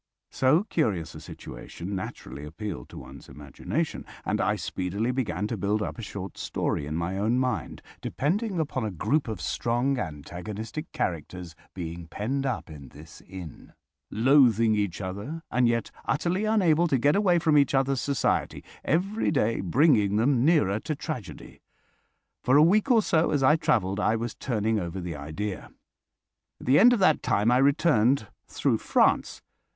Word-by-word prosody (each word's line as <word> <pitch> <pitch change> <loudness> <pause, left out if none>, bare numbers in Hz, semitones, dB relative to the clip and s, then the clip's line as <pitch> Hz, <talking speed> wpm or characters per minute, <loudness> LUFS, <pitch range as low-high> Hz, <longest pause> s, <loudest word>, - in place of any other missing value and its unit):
So 140 +8 +3
curious 105 - -1
a - - -9
situation 90 +4 -8
naturally 70 -6 -7
appealed 80 - -6
to - - -11
one's 65 +1 -11
imagination, 70 -2 -4 0.2
and - - 0
I - - +1
speedily 100 +6 -2
began 105 -7 -2
to 110 +1 -3
build 105 +3 0
up - - -5
a - - -4
short 100 -3 -7
story 70 - -2
in 75 - -4
my 85 +3 -2
own 110 +4 +1
mind, 130 -1 -2 0.2
depending 190 - -1
upon 140 -5 -2
a 110 - -1
group 110 - 0
of 110 -5 -4
strong 120 +7 0
antagonistic 100 - -6
characters 85 +1 -4 0.2
being 85 -1 -6
penned 135 +10 -2
up 125 - -3
in 75 -4 -11
this 80 +2 -14
inn, 90 -5 -10 0.4
loathing 115 -2 +4
each 100 -3 -1
other 100 - -5
and 125 -1 +3
yet 115 -1 0
utterly 180 +7 0
unable 175 -6 +3
to 140 - +2
get 145 +4 +3
away 195 -4 +3
from 160 -2 +2
each 140 -2 +4
other's 135 -1 +1
society, 140 -4 -1 0.2
every 195 +8 0
day 115 -7 +1
bringing 105 - +3
them 120 +3 +2
nearer 130 - +3
to 155 - -4
tragedy. 125 - -7 0.8
For 130 +3 +4
a 150 - +7
week 205 +9 +3
or 230 -4 +5
so, 160 -3 +2
as 145 -3 +1
I 150 +4 +6
travelled, 105 - 0
I 110 - +2
was 115 0 -3
turning 110 -3 -1
over 90 0 -4
the 85 -2 -5
idea. 80 +8 -5 0.9
At - - -11
the 130 +3 +5
end 240 +5 +8
of 245 - +3
that 155 -5 +4
time 105 +4 +2
I 125 - +4
returned 140 -4 +3 0.2
through - - 0
France. - - +1
115 Hz, 165 wpm, -26 LUFS, 95-145 Hz, 0.9 s, end